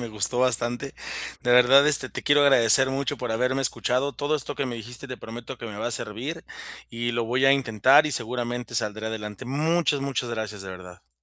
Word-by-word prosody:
me 120 - -5
gustó 110 +3 -2
bastante. 120 +1 +2 0.5
De 120 - +2
verdad, 130 +4 +6
este, 140 -4 +3
te - - -7
quiero 145 0 +4
agradecer 135 -1 +5
mucho 135 0 -2
por 125 -2 -5
haberme 125 +4 0
escuchado. 130 +3 -1
Todo 145 +1 -2
esto 145 0 -4
que 140 - -2
me 120 - -5
dijiste, 120 +4 -8
te 130 - -6
prometo 120 +2 -9
que 115 - -7
me 105 - -8
va 110 - -3
a - - -6
servir, 125 +9 -5 0.5
y 120 +1 -3
lo 120 0 -1
voy 125 +3 0
a 135 - +6
intentar 135 +3 +4
y - - -2
seguramente 120 0 -3
saldré 110 +1 -2
adelante. 105 +1 -6
Muchas, 155 +3 0
muchas 130 -3 -3
gracias, 110 -3 -5
de 95 - -8
verdad. 90 -10 -14
125 Hz, 210 wpm, -25 LUFS, 110-135 Hz, 0.5 s, verdad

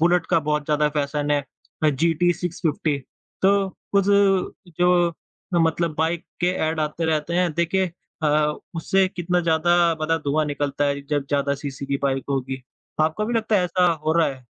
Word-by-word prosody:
Bullet 175 +1 +3
का - - +4
बहुत 150 -1 +1
ज़्यादा 150 0 +2
फ़ैशन 145 0 -1
है 145 - +3 0.4
अ, - - +6
जीटी 165 +4 +2
650। 160 -4 -2 0.4
तो 195 0 +3 0.3
कुछ 200 - +4 0.7
जो 175 -1 +3 0.5
मतलब 165 0 0
बाइक 165 +1 0 0.2
के 180 +1 +2
ऐड 160 0 -1
आते 155 +2 -2
रहते 160 +1 0
हैं 180 -1 +2
देखिए 185 +3 +1 0.4
अ, 155 - +3 0.5
उससे 190 +3 +2
कितना 180 -1 -1
ज़्यादा 170 +1 +2 0.2
मतलब 165 +1 0
धुआँ 155 +2 +1
निकलता 145 0 -1
है 140 0 0
जब 145 -2 0
ज़्यादा 140 -1 +1
सीसी 140 -1 -6
की 140 - 0
बाइक 135 -1 0
होगी, 135 -1 -2 0.4
आपको 160 +7 +1
भी 240 - -2
लगता 220 -2 +1
है 180 - +2
ऐसा 180 0 +2
हो 155 - +2
रहा 165 -1 +3
है? 130 -2 -8
160 Hz, 175 wpm, -23 LUFS, 145-175 Hz, 0.7 s, अ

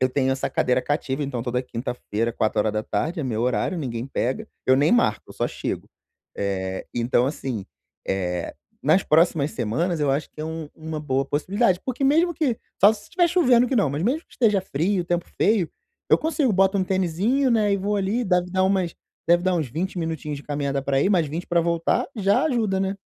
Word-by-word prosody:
eu 130 - +3
tenho 130 0 +1
essa 135 - -1
cadeira 125 0 +1
cativa, 145 -1 -2
então, 125 -4 -3
toda 125 0 -1
quinta-feira 115 -2 -3
16h 110 - -1
é 145 - -3
meu 115 -2 -1
horário, 125 - 0
ninguém 125 -5 -4
pega, 130 -1 -2 0.2
eu 130 0 +5
nem 145 - +3
marco, 175 - +2
eu - - -10
só - - -1
chego. - - -5 0.5
Eh, 95 -1 -3
então 120 +1 +2
assim, 130 -7 -4 0.4
eh, 90 -3 -2 0.3
nas 160 +6 +4
próximas 155 -2 +3
semanas 155 - -1
eu 145 - +1
acho 140 +3 -1
que - - -11
é - - -3
um 160 -1 -5
uma 160 -1 -6
boa 135 -2 0
possibilidade, 185 - +1
porque 260 +1 -2
mesmo 325 +6 +3
que 285 -8 0 0.2
só 205 +3 +8
se 210 -1 -9
estiver 350 - +1
chovendo 250 -9 +4
que 260 - -1
não, 200 - +3
mas 145 +4 -2
mesmo 275 +8 +1
que - - -32
esteja 210 -5 +2
frio, 180 +3 -1
tempo 175 0 -1
feio, 205 -6 +2 0.4
eu - - +6
consigo 300 -7 +1
boto 195 +1 +3
um 185 - +1
tenizinho, 190 - +1
né, 215 -3 +3
e - - +3
vou 205 +2 -1
ali, 200 +5 0
deve 180 -2 +1
dar 185 - +2
umas 190 -3 +1 0.3
deve 175 +1 +5
dar 185 0 +1
uns 155 -4 -1
20 175 +8 -3
minutinhos 160 -3 -3
de - - -11
caminhada 140 -1 -2
para 135 0 +1
ir, 195 - +2
mais 175 -6 +3
20 160 +5 -4
para 175 -1 +2
voltar, 170 0 +1
já 205 +7 +2
ajuda, 225 -10 +1
né. 195 +1 -1
165 Hz, 205 wpm, -24 LUFS, 135-200 Hz, 0.5 s, só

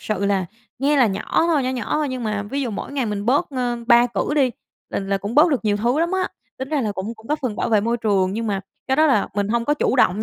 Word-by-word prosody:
sự 200 -2 -2
là 195 -2 +1 0.3
nghe 285 +3 +2
là 255 -4 +5
nhỏ 210 +10 0
thôi, 315 -5 +2
nhỏ 255 - -1
nhỏ 250 -4 -3
thôi 300 -1 0
nhưng 255 -2 -4
mà 210 -2 -1
ví 275 +8 -3
dụ 245 - -2
mỗi 210 - -6
ngày 270 -4 -1
mình 205 -1 -3
bớt, 270 +5 +2
ơ, 250 -3 -1
3 240 0 +6
cử 245 +4 -2
đi 270 -4 +3 0.4
là - - -1
là 195 0 -1
cũng 205 +4 -5
bớt 300 +5 +6
được 270 -6 0
nhiều 205 -1 +2
thứ 240 +8 +1
lắm 340 +1 +1
á, 380 0 0 0.3
tính 265 +1 -5
ra 300 -1 0
là 215 -4 -1
cũng 200 +4 -5
cũng 220 0 -17
góp 300 +3 -1
phần 235 -5 -2
bảo - - -1
vệ 215 -2 +3
môi 230 +3 0
trường. 200 -5 +1
Nhưng 225 +2 -3
mà 200 -2 -1 0.3
cái 265 - +1
đó 310 +1 +5
là 255 -9 +2
mình 205 -1 0
hông 235 +1 0
có 295 - +2
chủ 275 - 0
động 210 -4 +3
235 Hz, 300 wpm, -21 LUFS, 205-275 Hz, 0.4 s, 3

